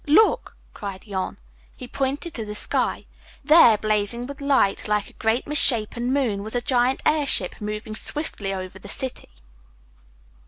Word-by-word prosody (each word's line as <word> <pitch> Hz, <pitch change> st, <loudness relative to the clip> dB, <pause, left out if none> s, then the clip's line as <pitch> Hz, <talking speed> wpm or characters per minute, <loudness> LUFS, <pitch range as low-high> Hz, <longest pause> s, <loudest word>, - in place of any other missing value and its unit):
Look!" 385 Hz, +10 st, +3 dB, 0.2 s
cried 200 Hz, -3 st, -7 dB
Jan. 190 Hz, -3 st, -4 dB, 0.4 s
He 250 Hz, -, -9 dB
pointed 275 Hz, +6 st, -3 dB
to 225 Hz, -, -4 dB
the 210 Hz, 0 st, -6 dB
sky. -, -, 0 dB, 0.4 s
There, 300 Hz, -9 st, +7 dB
blazing 215 Hz, +3 st, -1 dB
with 280 Hz, +2 st, -9 dB
light, 275 Hz, -10 st, +1 dB
like 210 Hz, -1 st, -1 dB
a -, -, -28 dB
great 225 Hz, +2 st, -1 dB
misshapen 245 Hz, -4 st, +2 dB
moon, 245 Hz, -8 st, 0 dB
was 220 Hz, +3 st, -4 dB
a 245 Hz, -, +1 dB
giant 250 Hz, +1 st, +1 dB
airship 285 Hz, -, +3 dB
moving 210 Hz, +1 st, -5 dB
swiftly 220 Hz, -8 st, -4 dB
over 190 Hz, 0 st, -6 dB
the 200 Hz, -, -12 dB
city. 260 Hz, -, 0 dB
230 Hz, 150 wpm, -23 LUFS, 210-275 Hz, 0.4 s, There